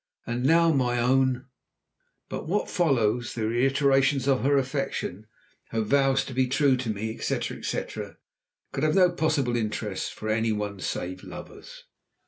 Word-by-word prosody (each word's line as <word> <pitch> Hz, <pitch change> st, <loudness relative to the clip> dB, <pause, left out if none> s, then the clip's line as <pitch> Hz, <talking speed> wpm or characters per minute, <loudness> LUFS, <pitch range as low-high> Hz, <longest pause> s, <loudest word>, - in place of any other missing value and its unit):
And 120 Hz, +2 st, -2 dB
now, 165 Hz, +4 st, +5 dB
my 125 Hz, -3 st, +1 dB
own 130 Hz, +1 st, +2 dB, 0.4 s
" -, -, -49 dB
But -, -, -5 dB
what 205 Hz, +5 st, -1 dB
follows, 120 Hz, -8 st, +1 dB
the 110 Hz, -2 st, -1 dB
reiterations 135 Hz, +3 st, +2 dB
of 135 Hz, -2 st, +3 dB
her 140 Hz, +1 st, +3 dB
affection, 135 Hz, -7 st, -2 dB, 0.4 s
her 115 Hz, -, -1 dB
vows 135 Hz, +4 st, +2 dB
to 130 Hz, -, -7 dB
be 130 Hz, 0 st, +2 dB
true 135 Hz, +1 st, +3 dB
to 125 Hz, -2 st, -4 dB
me, 110 Hz, +1 st, -3 dB
etc., -, -, -2 dB
etc., -, -, -5 dB, 0.5 s
could 135 Hz, +1 st, -3 dB
have 155 Hz, 0 st, +2 dB
no 180 Hz, -2 st, +5 dB
possible 155 Hz, -7 st, 0 dB
interest 110 Hz, -2 st, -2 dB
for 110 Hz, -, -6 dB
any 110 Hz, +1 st, +1 dB
one 105 Hz, -2 st, -3 dB
save 90 Hz, 0 st, -4 dB
lovers. -, -, -10 dB
130 Hz, 155 wpm, -26 LUFS, 115-140 Hz, 0.5 s, now